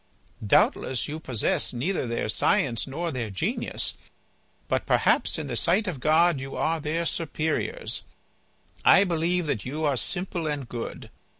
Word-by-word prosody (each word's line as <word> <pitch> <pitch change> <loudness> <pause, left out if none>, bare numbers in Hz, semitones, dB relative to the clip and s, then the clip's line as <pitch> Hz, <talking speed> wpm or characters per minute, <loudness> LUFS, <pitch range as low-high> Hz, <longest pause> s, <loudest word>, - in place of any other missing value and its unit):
Doubtless 110 +2 +2
you 155 +2 -5
possess 125 -6 0
neither 130 +4 -1
their 115 -1 -2
science 115 +3 +1
nor 165 +5 -3
their 120 -5 -3
genius, 95 -2 -2 0.7
but - - -1
perhaps - - +3
in 160 - -3
the 130 -4 -4
sight 185 - +2
of 170 -8 -3
God 160 +2 +4
you 135 +1 -6
are 165 +1 0
their 155 +3 -1
superiors. 165 - -2 0.8
I 195 - +7
believe 175 -1 0
that 125 -8 -1
you 150 +5 -3
are 145 -2 +2
simple 175 +3 -2
and 145 -4 -3
good. 120 0 -6
155 Hz, 145 wpm, -26 LUFS, 125-170 Hz, 0.8 s, I